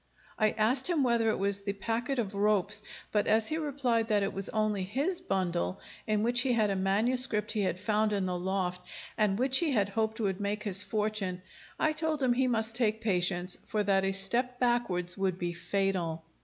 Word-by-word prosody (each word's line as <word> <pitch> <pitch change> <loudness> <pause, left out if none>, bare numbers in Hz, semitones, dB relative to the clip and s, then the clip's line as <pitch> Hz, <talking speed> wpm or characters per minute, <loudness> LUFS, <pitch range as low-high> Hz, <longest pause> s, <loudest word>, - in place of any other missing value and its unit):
I 215 -1 +4
asked 250 +8 +3
him 325 -5 +2
whether 235 -2 +2
it - - 0
was 200 +1 0
the 200 0 -3
packet 230 +6 -2
of 210 -4 -2
ropes, 205 0 +1 0.3
but 210 -1 +1
as 220 0 +3
he 315 - -1
replied 260 -7 0
that 210 -3 +2
it 195 - -2
was 195 0 -2
only 215 -2 0
his 280 - -2
bundle, 175 - -1 0.3
in 215 -1 +1
which 240 +1 +4
he 255 -1 +1
had 215 -3 +2
a - - -1
manuscript 210 +4 0
he 215 - -1
had 185 -2 -1
found 215 +1 +1
in 200 -2 0
the 180 -1 -2
loft, 180 0 -2 0.3
and 210 -3 +1
which 260 +2 +5
he 320 -5 0
had 200 -4 +1
hoped 220 +1 -2
would 195 -2 -1
make 205 +1 -2
his 195 -2 +3
fortune, 210 -4 -2 0.4
I 310 - +2
told 310 -2 -2
him 250 -2 +3
he 255 +1 +1
must 225 -2 +1
take 220 -3 +1
patience; 180 -4 0
for 215 -1 0
that 195 -1 +2
a 195 - +1
step 240 +6 -1
backwards 195 -8 0
would 190 -2 0
be 175 -1 -3
fatal. 170 -2 -2
210 Hz, 205 wpm, -30 LUFS, 195-240 Hz, 0.4 s, which